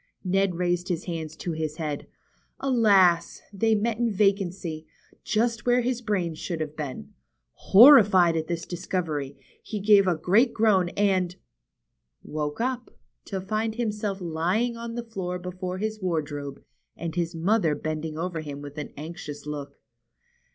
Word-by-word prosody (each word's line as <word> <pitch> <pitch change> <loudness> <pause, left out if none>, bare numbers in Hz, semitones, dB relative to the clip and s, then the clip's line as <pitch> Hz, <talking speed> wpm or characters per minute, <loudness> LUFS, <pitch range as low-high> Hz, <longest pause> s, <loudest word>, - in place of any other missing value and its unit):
Ned 190 -1 +1
raised 175 0 0
his 175 -1 -1
hands 160 -3 -5
to 170 - -4
his 155 -1 -3
head. 150 -3 -4 0.5
Alas! 205 -10 +3
they 220 +3 +2
met 220 +1 -1
in 235 -1 +1
vacancy, 190 -5 0 0.4
just 230 +2 0
where 245 0 +4
his 245 0 -1
brains 185 -8 -2
should 170 -3 -4
have 155 -1 -4
been. 130 - -6 0.4
Horrified 200 - +7
at 160 -1 -2
this 170 -1 -3
discovery, 170 -6 -3 0.2
he 215 - -5
gave 200 -1 +5
a 180 - +3
great 225 +9 +3
groan 200 -5 +3
and 185 -3 +1 0.5
— - - -54
woke 150 +2 -4
up, 250 0 -2 0.4
to 195 - -4
find 215 +3 -2
himself 210 -4 -2
lying 180 +8 0
on 230 0 -6
the 240 - -3
floor 185 -5 -4
before 180 0 -5
his 215 +1 -3
wardrobe, 145 -5 -3 0.3
and 165 -1 -4
his 170 -1 -2
mother 170 -2 +2
bending 155 0 -4
over 165 -1 -3
him 145 -2 -7
with 145 +1 -8
an 150 - -6
anxious 150 -2 -7
look. 150 -1 -6
180 Hz, 150 wpm, -26 LUFS, 160-215 Hz, 0.5 s, Horrified